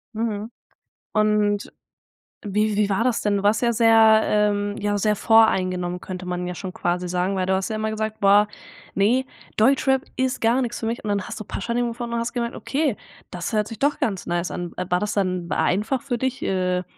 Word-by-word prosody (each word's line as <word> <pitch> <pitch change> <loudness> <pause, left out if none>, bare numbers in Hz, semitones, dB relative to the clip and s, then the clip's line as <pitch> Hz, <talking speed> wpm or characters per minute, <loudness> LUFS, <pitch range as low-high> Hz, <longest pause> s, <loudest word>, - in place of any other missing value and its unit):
Mhm. 220 0 -3 0.6
Und 210 -1 +1 0.7
wie 210 +1 0
wie 205 0 +1
war 200 +3 +1
das 245 -2 +1
denn? 205 -1 +1
Du 200 - -3
warst 210 +2 +3
ja 240 -1 +2
sehr 225 -1 +6
ähm, 205 -1 +1
ja 205 0 -1
sehr 210 +1 +1
voreingenommen, 185 -5 +2
könnte 185 -1 -7
man 180 0 -3
ja 180 - -4
schon 185 +1 -7
quasi 175 +1 -1
sagen, 180 +2 -1
weil 185 -1 0
du 190 - +1
hast 190 +2 -2
ja 220 - -2
immer 215 0 -1
gesagt: 220 0 -3
„Boah 200 +1 +5 0.5
ne, 235 +7 +2 0.3
Deutschrap 265 +3 +3
ist 260 0 -1
gar 235 +3 +3
nix 240 -2 -3
für - - -3
mich“ 230 +2 -3
und - - -5
dann 200 -1 0
hast - - -7
du - - -5
„Pashanim“ 240 +3 -2
gefunden 235 0 -5
und 235 - 0
hast 235 +1 -3
gemerkt: 235 -2 -2
„Okay, 280 -5 -1 0.3
das 180 +3 -5
hört 210 -1 +1
sich 225 -2 -8
doch 285 +1 +1
ganz 195 -5 -1
nice 175 0 -1
an.“ 175 -1 -5
War 180 0 -1
das 210 +2 -2
dann 185 -3 -1
einfach 215 +8 0
für 270 -4 -2
dich, 260 +2 -2
äh, 180 -1 0
210 Hz, 210 wpm, -23 LUFS, 190-230 Hz, 0.7 s, sehr